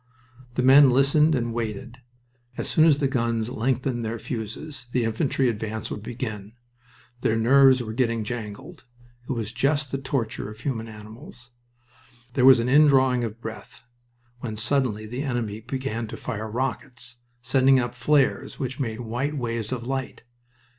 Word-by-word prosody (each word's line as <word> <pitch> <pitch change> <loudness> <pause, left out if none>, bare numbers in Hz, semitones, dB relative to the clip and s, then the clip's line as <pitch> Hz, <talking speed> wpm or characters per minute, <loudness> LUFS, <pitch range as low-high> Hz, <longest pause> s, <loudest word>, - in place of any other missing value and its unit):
The 125 - +1
men 135 +2 +8
listened 140 +4 +4
and 120 -2 -1
waited. 120 +2 -5 0.6
As - - -2
soon 155 - +4
as 155 -4 +5
the 140 - +2
guns 115 -3 -1
lengthened 125 0 -1
their 115 +1 -3
fuses 125 +5 -6
the 125 - +2
infantry 130 +4 0
advance 110 -1 -3
would 105 - -5
begin. 110 -3 -6 0.7
Their 115 - +1
nerves 130 +2 +5
were 110 -1 -6
getting 115 -2 0
jangled. 120 - -7 0.4
It - - +1
was 115 -3 -4
just 140 +3 0
the 135 - -2
torture 130 -6 -3
of 110 +1 -11
human 115 -4 -3
animals. 115 +3 -11 0.8
There 125 0 +3
was 130 -2 +8
an 115 - 0
indrawing 135 -3 +5
of 115 0 -5
breath 110 0 -9 0.6
when 110 -3 -5
suddenly 115 -2 0
the 120 +5 -5
enemy 120 -7 -2
began 120 -1 -4
to - - -7
fire 110 -3 -5
rockets, 125 +1 -3 0.3
sending 130 +1 +4
up 120 -1 -2
flares 135 +3 +1
which 130 0 -4
made 115 -3 -3
white 125 +6 -3
waves 115 -3 -3
of 120 -2 -3
light. 130 -2 -4
120 Hz, 155 wpm, -25 LUFS, 115-135 Hz, 0.8 s, men